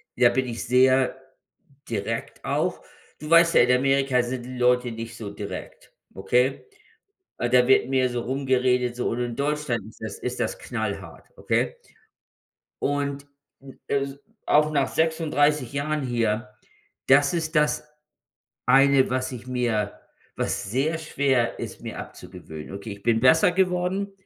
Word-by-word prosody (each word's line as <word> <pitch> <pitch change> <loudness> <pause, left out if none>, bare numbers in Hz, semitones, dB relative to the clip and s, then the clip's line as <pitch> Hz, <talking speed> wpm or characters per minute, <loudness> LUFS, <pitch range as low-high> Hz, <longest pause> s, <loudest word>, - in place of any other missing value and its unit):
ja 120 -1 +5
bin 130 +2 0
ich 115 -2 -5
sehr 130 +1 +4 0.7
direkt 115 +1 -4
auch. - - -1 0.4
Du 150 - -8
weißt 170 0 +6
ja, - - +7
in 125 - +3
Amerika 135 -1 +2
sind 120 0 -4
die 130 0 -8
Leute 125 0 +2
nicht 115 0 -7
so 105 -3 -6
direkt, 100 0 -8 0.2
okay? 125 +8 +1 0.7
Ah, 120 - -1
da 125 0 +4
wird 130 -1 +4
mehr 130 -1 +2
so 120 -1 -3
rumgeredet 125 -1 +1
so 125 - -1
und 120 - -3
in 120 -1 -3
Deutschland 145 -4 -1
ist 110 - -16
das 110 -2 -6
ist 125 0 -4
das - - -2
knallhart, - - -5
okay? 485 - 0 1.1
Und 140 0 -2 0.3
n 135 -1 -14
äh, 140 0 0 0.4
auch 150 +1 +4
nach 140 -3 +1
36 150 -4 +1
Jahren 150 +2 -2
hier, 120 -2 -1 0.6
das 140 +2 +5
ist 160 -1 -3
das 150 0 +1 0.8
eine, 135 +1 +5
was 130 +1 -1
ich 125 0 -8
mir 120 -5 -1 0.4
was 95 - -2
sehr 145 +8 0
schwer 135 -6 0
ist, - - -7
mir - - -7
abzugewöhnen. 90 -2 -9
Okay, 100 +3 -7
ich 100 0 -12
bin 115 0 +2
besser 160 +8 +5
geworden, 185 +2 0
130 Hz, 150 wpm, -25 LUFS, 120-145 Hz, 1.1 s, ja